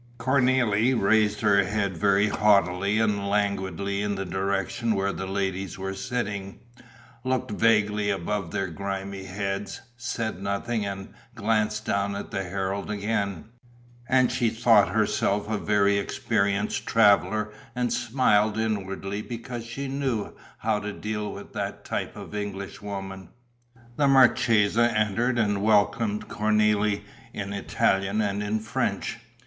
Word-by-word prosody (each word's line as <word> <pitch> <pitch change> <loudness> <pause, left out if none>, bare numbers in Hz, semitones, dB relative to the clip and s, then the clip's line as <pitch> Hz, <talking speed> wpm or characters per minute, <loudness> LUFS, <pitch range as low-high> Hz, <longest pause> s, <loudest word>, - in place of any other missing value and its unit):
Cornélie 125 -2 +2
raised 105 +1 +3
her 100 -2 +4
head 100 -1 -1
very 100 +3 +3
haughtily 100 -1 +3
and 105 -3 +1
languidly 100 -1 -1
in 105 -1 -1
the 95 0 -3
direction 100 +4 -1
where 100 0 0
the 95 - -5
ladies 95 -1 -2
were 95 0 -4
sitting, 100 -4 -4 0.7
looked 130 -1 -1
vaguely 105 -1 +2
above 100 -1 -2
their 95 - -1
grimy 95 +1 -5
heads, 100 +1 -4 0.2
said 115 -5 -3
nothing 100 +3 -1
and 95 -1 -6 0.2
glanced 110 -1 0
down 100 0 0
at 100 - -6
the 95 - -2
Herald 95 +2 -3
again; 100 -3 -2 0.6
and 130 -1 +4
she 125 -2 +1
thought 110 -2 +4
herself 105 -1 +1
a 110 -1 -1
very 100 -1 +2
experienced 100 0 -1
traveller 105 -1 +3 0.2
and 125 -1 0
smiled 110 -4 +2
inwardly 100 -2 -2
because 115 +1 -6
she 135 +4 -5
knew 135 -6 -2 0.2
how 110 -1 0
to 105 0 -4
deal 105 0 -4
with - - -10
that - - -4
type - - -3
of - - -9
Englishwoman. 100 -1 -6 0.7
The 145 - +3
marchesa 120 -4 +4
entered 115 +4 +1
and 105 -3 +1
welcomed 105 0 +2
Cornélie 105 -1 +2 0.3
in 100 0 -4
Italian 100 0 +1
and 100 -1 0
in 105 +1 -1
French. 110 +1 -2
105 Hz, 130 wpm, -26 LUFS, 100-110 Hz, 0.7 s, her